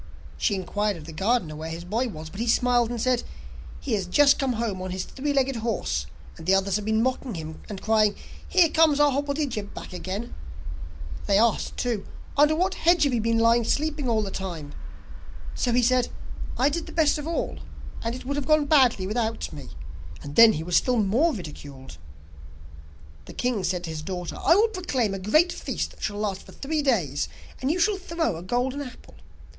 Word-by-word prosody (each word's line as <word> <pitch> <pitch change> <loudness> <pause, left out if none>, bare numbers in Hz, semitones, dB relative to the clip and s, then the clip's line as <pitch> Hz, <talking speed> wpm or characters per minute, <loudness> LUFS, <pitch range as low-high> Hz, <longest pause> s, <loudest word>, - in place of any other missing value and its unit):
She 205 - +1
inquired 205 +1 -1
of 155 - -11
the 165 - -8
gardener 190 -3 0
where 160 +1 -6
his 165 +1 -6
boy 225 +8 -1
was, 160 -7 -8
but 195 - -9
he 235 - -1
smiled, 240 0 +3
and 240 -1 -3
said: 250 +1 +2 0.6
'He 260 - -3
has 195 -4 0
just 280 +9 +5
come 270 -3 +1
home 220 -5 -2
on 185 - -4
his 185 0 -3
three 285 +7 -3
legged 270 -2 +1
horse, 230 0 -2 0.3
and 165 0 -10
the 190 - +5
others 195 0 +1
have 210 - -6
been 220 +1 +2
mocking 255 -3 -2
him, 160 -1 -7
and 200 -3 -7
crying: 215 -2 +3 0.3
"Here 350 -3 +5
comes 315 -2 +4
our 295 -1 +5
hobblety 285 +2 -1
jib 210 -5 -5
back - - -8
again!" 190 +5 -5 0.9
They 200 -1 +4
asked, 225 0 +1
too: 235 -5 -2 0.3
"Under 300 +2 +5
what 370 +4 +1
hedge 345 -1 +3
have 280 -3 +2
you 235 - +1
been 230 +1 +1
lying 230 +1 +4
sleeping 295 +2 -1
all 220 -2 +2
the 195 - -4
time?" 170 -7 -5 0.8
So 245 - 0
he 245 +1 +3
said: 250 0 +3 0.5
"I 265 +3 +4
did 335 +3 -3
the - - -9
best 310 -2 +3
of 295 - -6
all, 335 - -2 0.4
and 230 +1 -2
it 255 - -9
would 280 +2 -2
have 280 -2 -3
gone 305 -1 +4
badly 260 -10 +4
without 225 +2 -2
me." 145 -3 -9 0.5
And 145 0 -8
then 230 -1 +9
he 160 - -3
was 175 +1 -1
still 250 +8 +3
more 230 +11 +3
ridiculed.' 145 - -9 1.3
The - - -10
king 245 -6 -1
said 180 0 -1
to 165 - -5
his 155 -1 -5
daughter: 180 +1 -5
'I 335 - +6
will 430 +4 +5
proclaim 275 - -1
a 195 - -4
great 310 - +3
feast - - -3
that - - -18
shall 205 - -2
last 205 -2 -2
for - - -15
three 300 +2 -2
days, 175 - 0 0.3
and 260 - 0
you 325 - +1
shall 410 +3 +3
throw 335 - -2
a 165 - -7
golden 250 +8 -1
apple. 255 -4 -10
230 Hz, 210 wpm, -25 LUFS, 190-280 Hz, 1.3 s, then